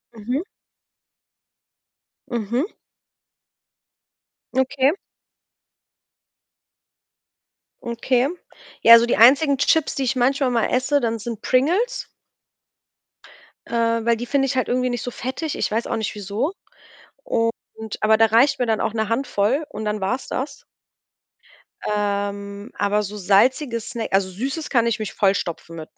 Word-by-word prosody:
Mhm. 245 Hz, +8 st, -3 dB, 1.9 s
Mhm. 240 Hz, -, -1 dB, 1.9 s
Okay. 265 Hz, +1 st, +2 dB, 2.9 s
Okay. 245 Hz, +2 st, 0 dB, 0.5 s
Ja, 230 Hz, 0 st, +10 dB
so 235 Hz, -, +2 dB
die 240 Hz, -, 0 dB
einzigen 275 Hz, +5 st, +6 dB
Chips, 310 Hz, +2 st, +2 dB
die 275 Hz, -, -1 dB
ich 255 Hz, -, 0 dB
manchmal 265 Hz, +2 st, +2 dB
mal 235 Hz, -2 st, +1 dB
esse 260 Hz, +3 st, +2 dB
dann, 230 Hz, -3 st, -1 dB
sind 225 Hz, 0 st, -6 dB
Pringles 355 Hz, -, +1 dB, 1.6 s
äh, 230 Hz, -1 st, 0 dB
weil 235 Hz, 0 st, +3 dB
die 240 Hz, -, -5 dB
finde 275 Hz, +1 st, +1 dB
ich 260 Hz, -, -2 dB
halt 255 Hz, -, +1 dB
irgendwie 255 Hz, +1 st, +1 dB
nicht 245 Hz, -1 st, -3 dB
so 245 Hz, -, -4 dB
fettig. 265 Hz, +7 st, -4 dB
Ich -, -, -1 dB
weiß 225 Hz, +2 st, -1 dB
auch -, -, -1 dB
nicht 220 Hz, -1 st, -3 dB
wieso 210 Hz, -, -2 dB, 0.7 s
und 230 Hz, -, +1 dB, 0.5 s
aber 220 Hz, 0 st, +4 dB
da 225 Hz, +1 st, +5 dB
reicht 245 Hz, +6 st, +3 dB
mir 245 Hz, -, 0 dB
dann 220 Hz, -2 st, 0 dB
auch 220 Hz, -, -1 dB
'ne 220 Hz, -2 st, -1 dB
Handvoll 240 Hz, +2 st, 0 dB
und 215 Hz, +1 st, -6 dB
dann 210 Hz, -1 st, -2 dB
war's 250 Hz, +8 st, -2 dB
das. 275 Hz, +2 st, -3 dB, 1.3 s
Ähm, 200 Hz, 0 st, -3 dB
aber 205 Hz, +1 st, +1 dB
so 210 Hz, +1 st, -6 dB
salzige 230 Hz, +6 st, +2 dB
snä 225 Hz, +1 st, -5 dB
also, 195 Hz, -1 st, +2 dB
Süßes 270 Hz, -, -4 dB
kann 235 Hz, -3 st, +3 dB
ich 230 Hz, -, 0 dB
mich 215 Hz, -2 st, -4 dB
vollstopfen 180 Hz, -4 st, -1 dB
mit, 155 Hz, -1 st, -10 dB
235 Hz, 130 wpm, -22 LUFS, 210-265 Hz, 2.9 s, Ja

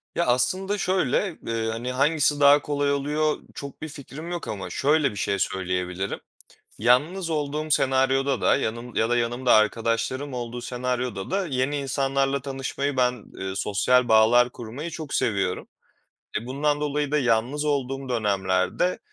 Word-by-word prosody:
Ya, 170 Hz, -, +1 dB
aslında 185 Hz, +12 st, +1 dB
şöyle, 185 Hz, -1 st, 0 dB
eee, 115 Hz, -1 st, -1 dB
hani, 120 Hz, +3 st, -4 dB
hangisi 145 Hz, +2 st, +2 dB
daha 145 Hz, +1 st, +7 dB
kolay 145 Hz, -1 st, 0 dB
oluyor? 150 Hz, +2 st, 0 dB, 0.2 s
Çok 140 Hz, -1 st, -8 dB
bir 160 Hz, -, -5 dB
fikrim 150 Hz, +4 st, -8 dB
yok 175 Hz, -, -4 dB
ama 100 Hz, -3 st, -5 dB
şöyle 145 Hz, -1 st, +2 dB
bir 105 Hz, -, -10 dB
şey 100 Hz, 0 st, -1 dB
söyleyebilirim. 90 Hz, +1 st, -2 dB, 0.6 s
Yalnız 150 Hz, -, +2 dB
olduğum 150 Hz, 0 st, -2 dB
senaryoda 135 Hz, -1 st, +2 dB
da -, -, +4 dB
yanım 120 Hz, -1 st, -4 dB
ya 110 Hz, +1 st, +2 dB
da 120 Hz, -, +3 dB
yanımda 120 Hz, +1 st, +1 dB
arkadaşlarım 115 Hz, +5 st, +1 dB
olduğu 120 Hz, 0 st, -5 dB
senaryoda 125 Hz, -4 st, -3 dB
da 195 Hz, -1 st, 0 dB
yeni 130 Hz, 0 st, -1 dB
insanlarla 135 Hz, 0 st, 0 dB
tanışmayı 135 Hz, +1 st, -3 dB
ben, 125 Hz, -3 st, +1 dB
eee, 95 Hz, 0 st, -4 dB
sosyal 120 Hz, +5 st, +2 dB
bağlar 115 Hz, +3 st, +5 dB
kurmayı 125 Hz, +9 st, -7 dB
çok 155 Hz, -4 st, -6 dB
seviyorum. 95 Hz, -4 st, 0 dB, 0.7 s
E, 120 Hz, -, -10 dB
bundan 145 Hz, +3 st, 0 dB
dolayı 145 Hz, -1 st, -1 dB
da 150 Hz, -, +2 dB
yalnız 125 Hz, +4 st, +1 dB
olduğum 135 Hz, -2 st, -1 dB
dönemlerde, 100 Hz, -, 0 dB
130 Hz, 145 wpm, -25 LUFS, 115-145 Hz, 0.7 s, daha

